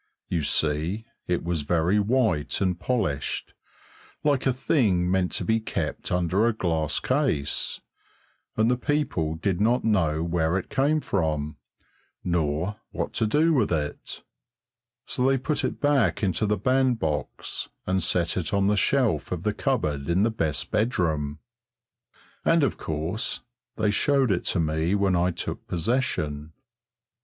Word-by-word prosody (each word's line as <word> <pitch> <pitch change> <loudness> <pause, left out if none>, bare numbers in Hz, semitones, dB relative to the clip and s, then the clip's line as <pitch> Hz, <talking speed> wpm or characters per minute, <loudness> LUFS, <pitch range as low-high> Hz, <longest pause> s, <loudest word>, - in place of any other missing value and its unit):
You 85 - 0
see, 80 +8 0 0.2
it 90 -1 0
was 85 -2 -1
very 85 +6 +2
white 105 - +1
and 90 -3 0
polished, 90 - -1 0.7
like 140 -3 +2
a - - +4
thing 105 - +1
meant 95 -1 +1
to - - -2
be 110 0 +2
kept 110 - -3
under 90 +5 +2
a 120 - +2
glass 80 -7 0
case, 130 - 0 0.8
and 110 +2 +3
the 125 - +1
people 125 - -1
did 90 +2 -1
not 120 +4 +3
know 85 -8 +2
where 85 0 +1
it 95 - -5
came 145 +3 +2
from, 75 - -1 0.7
nor 85 +3 -1
what - - -4
to 110 - +1
do 155 +8 +3
with 125 - +2
it; 75 -3 -3 0.8
so 125 - -1
they 135 0 +3
put 145 +2 -1
it - - -2
back 145 -7 +2
into 100 +2 +1
the 105 +1 +1
bandbox 120 - 0 0.2
and 95 +1 +1
set 85 +1 0
it 90 +2 -1
on 100 -1 +2
the 105 +1 +3
shelf 100 - +1
of - - -3
the - - +1
cupboard 70 0 -1
in 90 +4 +3
the 115 - +2
best 80 - -2
bedroom, 80 -10 0 1.1
and 165 -2 +4
of 135 - +1
course 80 +8 -2 0.3
they 110 -2 +1
showed 135 +2 +2
it 85 - 0
to 95 - 0
me 80 +3 +1
when 100 -2 +2
I 90 +1 +2
took 90 - -5
possession. 80 - -1
95 Hz, 150 wpm, -26 LUFS, 80-115 Hz, 1.1 s, a